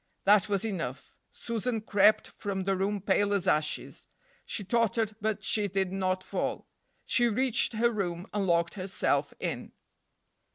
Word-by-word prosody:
That 210 +1 +5
was 200 +1 +1
enough. 165 - -5 0.2
Susan 230 0 -2
crept 210 0 +3
from 195 -2 -4
the 195 +1 +1
room 195 +2 -1
pale 205 +1 +2
as 195 -1 -1
ashes. 155 -3 -1 0.4
She 205 - -4
tottered, 225 0 +1
but 215 0 -1
she 210 -2 +2
did 190 -1 -1
not 185 -1 -1
fall. - - -3 0.4
She 240 -1 +3
reached 245 +1 +2
her 235 +2 +2
room 180 -5 -3
and 200 -2 0
locked 170 -1 +2
herself 190 -1 0
in. - - -4
200 Hz, 150 wpm, -29 LUFS, 185-215 Hz, 0.4 s, That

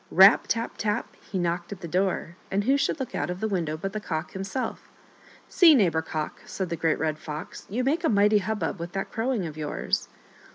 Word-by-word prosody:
Rap! 195 +3 +7
tap! 230 0 -1
tap! 210 -1 -1 0.2
he 195 - -1
knocked 175 0 -1
at 195 -2 -7
the 170 - -5
door, 180 -1 0
and 200 +1 0
who 265 +5 +3
should 280 +2 0
look 265 - -4
out - - -1
of 180 +1 -4
the 220 - 0
window 170 -6 -1
but 195 +4 -4
the 215 - -2
Cock 165 -4 -4
himself. 195 +7 -4 0.3
" - - -25
See, 330 -4 +7
Neighbor 170 - +3
Cock," 155 -1 -4
said 190 -3 -3
the 170 - -1
Great 160 -1 +1
Red 155 -1 -1
Fox, 155 +1 -7
" - - -30
you 235 +6 -1
make 310 +6 +1
a 320 - +3
mighty 210 0 +4
hubbub 205 -1 -2
with 170 +1 -6
that 195 - -3
crowing 230 -4 -1
of 155 -2 -7
yours." 150 -1 -2
190 Hz, 230 wpm, -26 LUFS, 170-220 Hz, 0.3 s, Rap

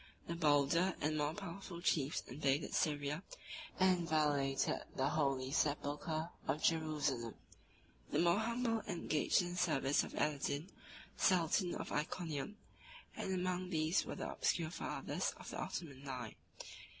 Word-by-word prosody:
The 170 - -3
bolder 165 +3 +3
and 155 +1 0
more 150 +1 0
powerful 190 -2 -6
chiefs 150 -4 +1
invaded 140 +2 0
Syria, 150 +1 0 0.6
and 185 -2 +4
violated 145 -3 +2 0.2
the 135 +1 +2
holy 135 -4 +1
sepulchre 155 +2 0 0.2
of 150 - 0
Jerusalem: 150 -8 +1 0.7
the - - 0
more 170 +3 +4
humble 230 0 0
engaged 160 0 +2
in 175 - -3
the 180 - -5
service 145 -5 +3
of - - -7
Aladin, 150 +3 0 0.5
sultan 180 0 +3
of - - -5
Iconium; 155 +3 -2 0.6
and - - -3
among 185 0 -1
these 160 0 +2
were - - -5
the - - -4
obscure 165 -2 0
fathers - - -2
of - - -8
the - - -5
Ottoman 140 -5 -5
line. 125 -5 -5
155 Hz, 135 wpm, -37 LUFS, 145-175 Hz, 0.7 s, and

